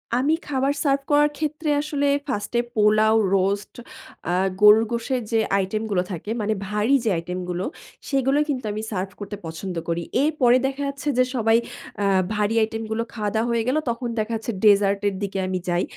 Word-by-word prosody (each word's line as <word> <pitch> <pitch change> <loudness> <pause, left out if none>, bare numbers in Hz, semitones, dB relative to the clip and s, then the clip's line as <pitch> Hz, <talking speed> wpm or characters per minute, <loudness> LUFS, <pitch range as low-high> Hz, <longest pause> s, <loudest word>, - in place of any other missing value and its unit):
আমি 275 +5 +2
খাবার 275 -1 +1
সার্ভ 280 -2 +2
করার 295 0 +5
ক্ষেত্রে, 305 0 -2
আসলে 290 -1 -1 0.2
1st 210 -6 -3
এ - - +4
পোলাও, 215 +1 +4 0.2
রোস্ট, 200 +2 -1 0.6
আ - - +1 0.3
গরুর 210 +2 +7
গোশের 240 +2 -1
যে 225 - +3 0.2
আইটেম 200 +3 -1
গুলো 180 -2 +2
থাকে, 180 +3 -6
মানে 215 +1 0
ভারী 210 +6 +2
যে - - +3
আইটেম 180 +2 -4
গুলো, 180 +2 -2 0.4
সেগুলোই 275 +1 +2
কিন্তু 255 -5 -2
আমি 210 +1 -4
সার্ভ 190 -1 -2
করতে 205 0 -6
পছন্দ 170 +3 -6
করি। 170 0 -1 0.2
এরপরে 270 -5 +4
দেখা 270 +1 -5
যাচ্ছে, 280 +1 -6
যে 255 - +6
সবাই 225 -1 +3 0.5
আ - - +2 0.3
ভারী 210 +1 0
আইটেম 225 +1 -3
গুলো 225 +1 0
খাওয়া-দাওয়া 220 +1 -1
হয়ে 230 -1 +1
গেলো, 275 +5 +2
তখন 235 +1 -3
দেখা 215 +2 -2
যাচ্ছে, 225 +2 -4
ডেজার্ট 200 -1 +5
এর 195 - -6
দিকে 195 -1 -3
আমি 185 0 -1
যাই। 175 +1 +1
220 Hz, 185 wpm, -23 LUFS, 200-265 Hz, 0.6 s, গরুর